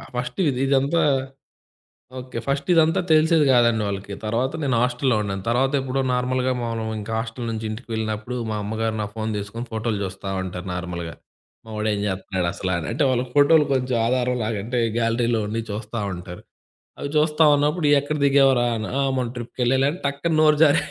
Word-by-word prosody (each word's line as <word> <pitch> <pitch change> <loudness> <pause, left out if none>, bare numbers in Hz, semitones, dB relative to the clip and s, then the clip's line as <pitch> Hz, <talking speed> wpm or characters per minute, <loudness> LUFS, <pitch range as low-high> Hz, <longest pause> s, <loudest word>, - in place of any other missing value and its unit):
First 125 +9 -4
విది 130 -3 0
ఇదంతా 140 +5 +2 1.2
okay. 125 -2 -6
First 140 +4 -1
ఇదంతా 165 0 +4
తెలిసేది 155 -1 +4
కాదండి 115 -3 +3
వాళ్ళకి. 100 0 -5
తరవాత 120 +5 0
నేను 130 -3 +1
హాస్టల్లో 125 0 +1
ఉన్నాను. 95 -1 -3
తరవాతెప్పుడో 135 +2 +1
నార్మల్‌గా, 130 +1 0
మామూలుగింక 110 -2 -4
హాస్టలు 115 +1 -5
నుంచి 110 0 -4
ఇంటికి 110 +3 -7
వెళ్ళినప్పుడు, 110 +2 -3 0.2
మా - - -2
అమ్మగారు 110 +1 -2
నా 105 - -2
ఫోను 110 0 -2
తీసుకొని, 105 +4 -5
ఫోటోలు 110 -2 -2
చూస్తా 95 +1 -6
ఉంటారు 90 0 -6
నార్మల్‌గా. 85 -2 -5 0.5
మా - - -13
వాడు 110 0 0
ఏం 100 - -2
చేత్తన్నాడు 95 -1 -2
అసల 95 - -4
అని, 80 - -6
అంటే 130 - 0
వాళ్ళకి 125 0 -1
ఫోటోలు 150 +2 +6
కొంచెం 125 -1 0
ఆధారం 125 0 +1
లాగా. 110 -2 -2
అంటే, 125 +1 -1 0.2
గ్యాలరీలో 115 0 +1
ఉన్నయి 115 +2 -3
చూస్తా 110 +2 -5
ఉంటారు. 90 0 -9 0.6
అవి 145 - -4
చూస్తా 150 +1 +3
ఉన్నప్పుడు, 150 +3 +1
ఇయ్యేక్కడ 145 +1 +2
దిగావురా 135 -3 +4
అన్నా, 110 - -4
"ఆ! - - +2 0.2
మొన్న 120 -2 -1
ట్రిప్‌కెళ్ళాలే." 125 +2 0
అని 180 - -8
టక్కున 140 +4 -1
నోరు 155 -1 +5
జారీ, 145 -2 +4
120 Hz, 170 wpm, -23 LUFS, 110-135 Hz, 1.2 s, ఫోటోలు